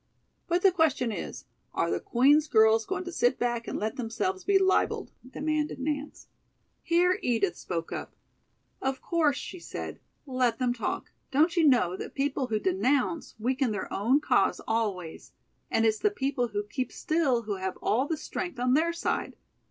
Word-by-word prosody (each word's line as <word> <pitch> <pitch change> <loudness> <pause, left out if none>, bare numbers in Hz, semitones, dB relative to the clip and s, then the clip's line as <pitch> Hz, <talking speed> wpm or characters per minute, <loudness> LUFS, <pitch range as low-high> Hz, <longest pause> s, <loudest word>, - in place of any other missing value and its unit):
"But 350 0 +1
the 390 - +7
question 315 -9 +2
is: - - -6 0.3
are - - +1
the - - 0
Queen's 290 +5 +4
girls 220 -3 +4
going 385 -1 -2
to 355 - -6
sit 245 -5 +2
back 240 -1 -1
and - - -3
let 215 +5 -3
themselves 225 -6 -2
be 400 - +4
libeled?" 380 0 +1 0.2
demanded 305 +2 -1
Nance. 290 +1 -4 0.5
Here 360 +3 +2
Edith 210 -7 +1
spoke 165 -2 -4
up. - - -6 0.7
"Of 265 0 -1
course," 315 -5 +1
she 365 - -7
said, - - -7 0.3
"let 255 -4 +1
them 250 -1 +1
talk. 235 - -3 0.2
Don't 315 +6 +3
you 330 -3 +4
know 240 -10 +3
that - - -7
people 275 -1 0
who 215 -2 0
denounce 250 - 0
weaken 255 +3 0
their 210 -3 -4
own 235 +8 +3
cause - - +2
always, 200 -7 -2 0.4
and 225 - +2
it's 220 -1 +2
the 420 - +3
people 270 -9 -1
who 205 -2 -3
keep 255 +5 -4
still 310 -8 +1
who 210 -2 -3
have 190 0 -4
all 255 +6 +1
the 320 - -1
strength 350 +1 -5
on 250 +1 +2
their 330 +4 +3
side? 335 - -2
260 Hz, 175 wpm, -28 LUFS, 225-310 Hz, 0.7 s, the